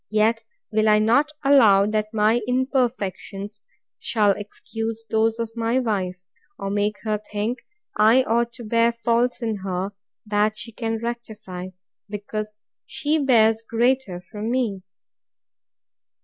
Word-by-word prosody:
Yet 220 Hz, +2 st, +2 dB, 0.3 s
will 215 Hz, 0 st, +3 dB
I 210 Hz, -, +6 dB
not 240 Hz, +8 st, +3 dB
allow, 225 Hz, -9 st, +6 dB
that 215 Hz, 0 st, -1 dB
my 220 Hz, +2 st, +3 dB
imperfections 230 Hz, -6 st, -1 dB, 0.4 s
shall 210 Hz, -3 st, +3 dB
excuse 225 Hz, +2 st, -5 dB
those 225 Hz, 0 st, +2 dB
of 230 Hz, -1 st, -3 dB
my 230 Hz, +1 st, 0 dB
wife, 185 Hz, -7 st, -2 dB, 0.3 s
or 195 Hz, 0 st, -4 dB
make 205 Hz, +1 st, 0 dB
her 215 Hz, -2 st, 0 dB
think 210 Hz, +3 st, -3 dB, 0.4 s
I 225 Hz, +5 st, +5 dB
ought 235 Hz, 0 st, +1 dB
to 240 Hz, -, -9 dB
bear 230 Hz, +1 st, +3 dB
faults 235 Hz, +1 st, 0 dB
in 220 Hz, -2 st, -1 dB
her, 190 Hz, 0 st, -3 dB, 0.3 s
that 210 Hz, 0 st, +1 dB
she 230 Hz, +2 st, -6 dB
can 225 Hz, 0 st, -2 dB
rectify, 220 Hz, -6 st, -6 dB, 0.4 s
because 210 Hz, +1 st, -5 dB, 0.3 s
she 305 Hz, +1 st, 0 dB
bears 225 Hz, -5 st, +4 dB
greater 230 Hz, -4 st, 0 dB
from 210 Hz, +4 st, -6 dB
me. 235 Hz, -6 st, 0 dB
220 Hz, 130 wpm, -23 LUFS, 210-235 Hz, 0.4 s, I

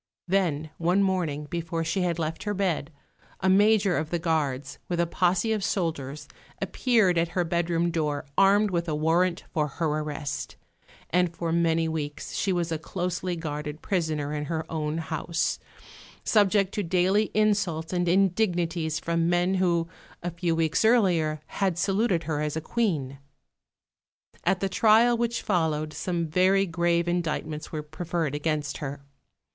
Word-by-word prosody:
Then 165 Hz, -5 st, 0 dB
one 180 Hz, +4 st, +3 dB
morning, 175 Hz, -6 st, 0 dB
before 165 Hz, +1 st, -3 dB
she 170 Hz, +4 st, -1 dB
had 175 Hz, -2 st, 0 dB
left 165 Hz, -1 st, -3 dB
her 205 Hz, -1 st, -2 dB
bed, 175 Hz, -6 st, -1 dB, 0.5 s
a 190 Hz, -, 0 dB
major 200 Hz, 0 st, +4 dB
of 155 Hz, 0 st, -2 dB
the 175 Hz, -, 0 dB
guards, 150 Hz, -4 st, -1 dB
with 175 Hz, -1 st, -1 dB
a 170 Hz, -, +3 dB
posse 180 Hz, +5 st, +1 dB
of 210 Hz, -2 st, -2 dB
soldiers, 155 Hz, -5 st, -2 dB, 0.3 s
appeared 215 Hz, -9 st, +2 dB
at 165 Hz, -, +1 dB
her 180 Hz, -, +3 dB
bedroom 170 Hz, 0 st, 0 dB
door 150 Hz, -4 st, -1 dB
armed 200 Hz, +1 st, +4 dB
with 170 Hz, -1 st, -1 dB
a 155 Hz, -, 0 dB
warrant 170 Hz, +3 st, +1 dB
for 150 Hz, -3 st, +1 dB
her 165 Hz, +4 st, -3 dB
arrest; 150 Hz, -2 st, -4 dB, 0.6 s
and 180 Hz, -1 st, +2 dB
for 165 Hz, -1 st, -2 dB
many 165 Hz, -1 st, +2 dB
weeks 150 Hz, -2 st, -4 dB
she 195 Hz, -, 0 dB
was 175 Hz, -2 st, -1 dB
a 160 Hz, -, -1 dB
closely 180 Hz, +2 st, -3 dB
guarded 150 Hz, -2 st, -5 dB
prisoner 155 Hz, -6 st, -1 dB
in 150 Hz, 0 st, -2 dB
her 160 Hz, 0 st, -3 dB
own 155 Hz, -1 st, -2 dB
house, 160 Hz, 0 st, -2 dB, 0.6 s
subject 205 Hz, -2 st, +3 dB
to 210 Hz, -, -1 dB
daily 190 Hz, +4 st, +2 dB
insults 200 Hz, -7 st, +1 dB
and 175 Hz, -1 st, +1 dB
indignities 175 Hz, -4 st, +1 dB
from 170 Hz, 0 st, 0 dB
men 175 Hz, +2 st, +2 dB
who, 175 Hz, -3 st, +1 dB, 0.4 s
a 175 Hz, -, -2 dB
few 170 Hz, 0 st, -1 dB
weeks 160 Hz, +2 st, +1 dB
earlier, 175 Hz, -10 st, +3 dB
had 190 Hz, -4 st, -1 dB
saluted 195 Hz, -1 st, +1 dB
her 150 Hz, -1 st, -2 dB
as 150 Hz, +1 st, -2 dB
a -, -, +1 dB
Queen. 155 Hz, -, -1 dB, 1.3 s
At 185 Hz, -, +2 dB
the 195 Hz, -, +1 dB
trial 225 Hz, +4 st, +5 dB
which 235 Hz, 0 st, -1 dB
followed 155 Hz, -5 st, 0 dB
some 175 Hz, -2 st, -2 dB
very 185 Hz, +4 st, +3 dB
grave 170 Hz, 0 st, +1 dB
indictments 160 Hz, -3 st, -2 dB
were 155 Hz, -2 st, -4 dB
preferred 160 Hz, 0 st, -3 dB
against 150 Hz, 0 st, -2 dB
her. 140 Hz, -1 st, -6 dB
170 Hz, 155 wpm, -26 LUFS, 155-185 Hz, 1.3 s, trial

